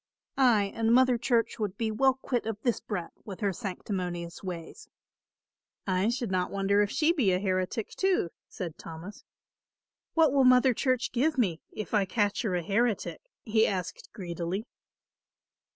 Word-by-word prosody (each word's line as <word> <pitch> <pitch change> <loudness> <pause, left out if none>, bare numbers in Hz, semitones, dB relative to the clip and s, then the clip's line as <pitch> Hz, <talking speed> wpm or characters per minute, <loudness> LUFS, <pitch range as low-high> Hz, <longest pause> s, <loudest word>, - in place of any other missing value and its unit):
Ay, 220 -7 +4
and 225 0 +1
Mother 255 -1 +5
Church 235 -2 +1
would 205 -2 -2
be 225 -1 -1
well 265 +4 +3
quit 250 -3 -2
of 220 -2 -3
this 240 -3 +1
brat 180 -5 -5
with 200 -1 -8
her 200 -2 +1
sanctimonious 180 -4 -4
ways." 180 - -7 1.0
"I 185 +2 +1
should 240 -3 -2
not 180 -1 0
wonder 200 +1 +2
if 205 - +1
she 320 +7 +2
be 250 - +2
a 180 - +3
heretic, 185 +3 -1
too," 375 - +1 0.2
said 170 -4 -6
Thomas. 165 +5 -9 0.9
"What 320 -4 +5
will 275 -1 +4
Mother 255 0 +6
Church 255 +1 0
give 290 +5 +1
me, 185 -10 +1
if 215 - -6
I 205 -2 +3
catch 205 0 0
her 210 -7 -1
a 175 - -1
heretic?" 215 +4 0 0.2
he 220 0 +3
asked 185 -3 -4
greedily. 180 +1 -4
210 Hz, 160 wpm, -29 LUFS, 185-245 Hz, 1.0 s, Mother